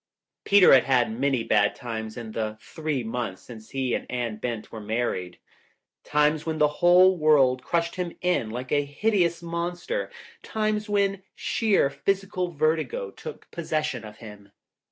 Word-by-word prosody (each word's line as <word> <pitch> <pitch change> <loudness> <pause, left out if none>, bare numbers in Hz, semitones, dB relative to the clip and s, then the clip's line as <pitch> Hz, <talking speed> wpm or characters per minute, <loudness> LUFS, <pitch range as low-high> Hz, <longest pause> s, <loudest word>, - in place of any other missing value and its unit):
Peter 200 -2 +7
had 130 -2 +6
had 120 -3 +1
many 135 -3 +1
bad 105 -2 +2
times 110 -2 -6
in 115 -2 -6
the 110 -1 -3
three 155 -1 -3
months 115 -4 -4
since 110 -3 -12
he 130 -3 -2
and - - -3
Anne 120 -3 -3
Bent 115 -1 -5
were 110 - -7
married. 105 -5 -2 0.7
Times 150 +1 +2
when 160 -1 -3
the 150 -1 +4
whole 180 +2 +6
world 140 -6 +4
crushed 170 +4 -1
him 180 -2 -2
in 180 -11 0
like 125 +3 -6
a 145 -1 +3
hideous 170 +3 0
monster, 175 - -3 0.3
times 215 -1 -2
when 200 -1 +1
sheer 205 - +1
phys 195 +6 -1
ical 185 -3 -3
vertigo 155 - -1
took - - -10
possession 155 -6 -2
of 105 -1 -11
him. 105 -2 -12
145 Hz, 155 wpm, -26 LUFS, 115-175 Hz, 0.7 s, Peter